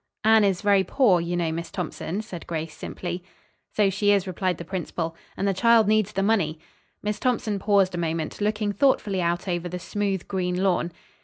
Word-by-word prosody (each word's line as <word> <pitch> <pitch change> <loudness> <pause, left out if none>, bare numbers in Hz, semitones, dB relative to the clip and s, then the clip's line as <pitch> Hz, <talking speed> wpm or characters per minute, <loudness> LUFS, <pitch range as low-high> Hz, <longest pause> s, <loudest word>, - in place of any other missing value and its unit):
"Anne 220 0 +6
is 195 -3 +1
very 200 -2 +4
poor, 200 -7 +3
you 175 +1 -2
know, 170 -2 0
Miss 170 +1 -4
Thompson," 180 +2 -4
said 185 -6 -9
Grace 160 -2 -4
simply. 175 0 -5 0.5
"So 205 -2 +3
she 205 +2 +2
is," 200 -2 +3
replied 185 -1 -1
the 170 - -7
principal, 165 -2 -3 0.2
"and 195 - 0
the 195 - +2
child 230 +2 +4
needs 215 -2 +2
the 195 - -1
money." 195 -7 +1 0.5
Miss 210 0 -2
Thompson 225 -5 0
paused 195 -2 +3
a 175 - -3
moment, 165 +2 -2
looking 210 0 0
thoughtfully 205 -6 +2
out 175 +2 -1
over 175 -1 -2
the 180 - -4
smooth 195 0 -2
green 180 -1 -1
lawn. 175 -2 +1
190 Hz, 190 wpm, -25 LUFS, 175-205 Hz, 0.5 s, Anne